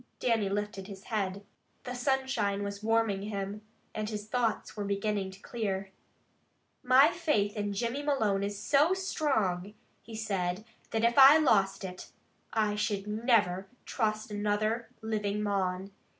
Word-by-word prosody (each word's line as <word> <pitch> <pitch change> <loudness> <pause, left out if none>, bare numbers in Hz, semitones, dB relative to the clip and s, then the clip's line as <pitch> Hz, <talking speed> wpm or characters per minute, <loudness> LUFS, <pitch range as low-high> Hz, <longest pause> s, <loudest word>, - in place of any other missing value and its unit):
Dannie 225 -5 +1
lifted 200 -1 -3
his 195 -1 -10
head. 200 -3 -3 0.4
The 250 - -5
sunshine 245 -6 0
was 200 0 -5
warming 225 -3 +1
him, 200 0 -4 0.3
and 215 0 -3
his 210 -1 -5
thoughts 230 -2 -1
were 210 - -3
beginning 200 0 -1
to 190 +1 -12
clear. 195 -4 -3 0.9
"My 260 +5 +6
faith 300 - 0
in 205 -1 -2
Jimmy 235 +6 -2
Malone 220 -9 +1
is 200 0 -3
so 290 - +3
strong," 220 - -1 0.3
he 230 - -10
said, 195 -2 -2 0.2
"that 225 0 -1
if 235 +3 +4
I 275 +3 +10
lost 195 -10 +2
it, 185 -1 -7 0.4
I 215 -2 +1 0.3
never 210 -4 +1
should 250 - -32
trust 215 -2 -1
another 215 +2 -1
living 210 -1 -1
mon. 190 -1 -1
210 Hz, 140 wpm, -30 LUFS, 200-235 Hz, 0.9 s, I